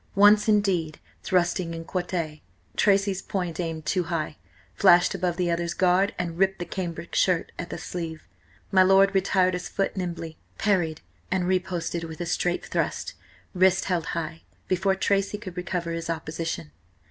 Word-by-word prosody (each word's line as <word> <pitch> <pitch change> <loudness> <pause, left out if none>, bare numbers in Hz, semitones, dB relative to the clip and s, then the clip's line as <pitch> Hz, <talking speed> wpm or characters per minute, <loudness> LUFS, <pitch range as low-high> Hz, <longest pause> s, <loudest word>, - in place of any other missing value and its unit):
Once, 205 +2 +6
indeed, 190 -7 +1 0.2
thrusting 175 -1 0
in 165 0 -7
quarte, 170 -4 -3 0.3
Tracy's 200 -1 +2
point, 180 -5 -3
aimed 165 -3 -3
too 180 -3 +1
high, 160 -3 -2 0.4
flashed 175 -2 +5
above 180 -2 -1
the 175 -2 +1
other's 170 0 -1
guard 185 +3 +3
and 170 -1 -3
ripped 195 0 +3
the 175 - -4
cambric 170 -1 -5
shirt 180 -3 +2
at 175 - -4
the - - -5
sleeve. 165 -3 -6 0.4
My 190 - +6
lord 195 +1 +5
retired 190 -1 +3
his 180 0 -4
foot 195 - -1
nimbly, 170 -3 -5 0.2
parried, 175 -7 +1 0.3
and 185 -1 +1
riposted 175 -2 -1
with 160 0 -8
a 175 - -2
straight 175 +1 -1
thrust, - - -2 0.4
wrist 190 0 +3
held 175 -4 -1
high, 165 0 -4 0.3
before 190 +1 +2
Tracy 200 +1 +1
could 185 -4 -8
recover 180 -2 -3
his 165 0 -4
opposition. 160 - -4
180 Hz, 160 wpm, -26 LUFS, 165-190 Hz, 0.4 s, Once